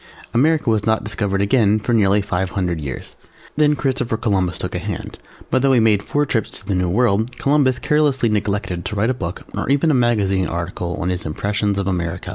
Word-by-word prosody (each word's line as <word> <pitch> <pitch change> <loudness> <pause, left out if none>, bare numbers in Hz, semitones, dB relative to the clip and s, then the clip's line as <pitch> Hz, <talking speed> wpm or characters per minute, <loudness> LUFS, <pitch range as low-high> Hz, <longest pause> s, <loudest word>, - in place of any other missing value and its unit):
America 150 +5 +2
was 110 -2 +2
not 110 0 +1
discovered 100 -1 -1
again 105 0 +3
for 115 +3 -2
nearly 100 -2 +3
five 95 -2 -1
hundred 90 -3 -2
years. 70 -3 -7 0.4
Then 150 0 +3
Christopher 130 -5 -1
Columbus 95 -7 0
took 90 - -4
a 90 - -2
hand, 100 0 -6 0.3
but 130 - +2
though 135 0 +3
he 125 - +5
made 110 -3 +3
four 145 +7 0
trips 110 -6 -1
to 95 - -8
the 100 - -1
New 90 -1 0
World, 115 +3 +1
Columbus 140 -3 +2
carelessly 145 -4 +1
neglected 100 -4 -1
to - - -4
write 110 +5 +1
a - - 0
book 90 -6 -5
or - - -3
even 140 +3 +3
a - - +2
magazine 105 -7 +2
article 85 0 -4
on 90 - -2
his 90 -1 -2
Impressions 100 +5 -1
of 100 -1 -1
America. 90 -1 -3
105 Hz, 210 wpm, -20 LUFS, 95-125 Hz, 0.4 s, he